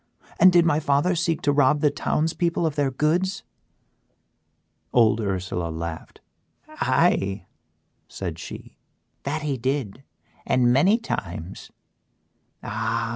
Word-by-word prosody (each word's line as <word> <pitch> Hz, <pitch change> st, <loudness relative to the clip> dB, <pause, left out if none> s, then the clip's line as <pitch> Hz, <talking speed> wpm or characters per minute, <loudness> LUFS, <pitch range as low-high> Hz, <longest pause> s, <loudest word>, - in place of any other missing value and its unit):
and 185 Hz, -, +8 dB
did 175 Hz, -1 st, +5 dB
my 155 Hz, -3 st, +2 dB
father 145 Hz, +4 st, +1 dB
seek 170 Hz, -2 st, -1 dB
to 145 Hz, -, +3 dB
rob 145 Hz, +1 st, +3 dB
the 150 Hz, -, +3 dB
towns 155 Hz, +2 st, -1 dB
people 170 Hz, -1 st, 0 dB
of 160 Hz, -, 0 dB
their 145 Hz, -2 st, +1 dB
goods?" 175 Hz, +8 st, 0 dB, 1.5 s
Old 115 Hz, -2 st, +4 dB
Ursela 90 Hz, -4 st, -2 dB
laughed. 80 Hz, 0 st, -7 dB, 0.5 s
"Aye," 95 Hz, +1 st, +1 dB, 0.6 s
said -, -, -6 dB
she, -, -, -10 dB, 0.5 s
"that 150 Hz, +2 st, -2 dB
he 140 Hz, -3 st, -1 dB
did 130 Hz, -3 st, -2 dB, 0.4 s
and 125 Hz, -1 st, +2 dB
many 185 Hz, -, +4 dB
times. 85 Hz, -, -6 dB, 0.9 s
Ah! 115 Hz, +1 st, -2 dB
140 Hz, 120 wpm, -24 LUFS, 110-160 Hz, 1.5 s, and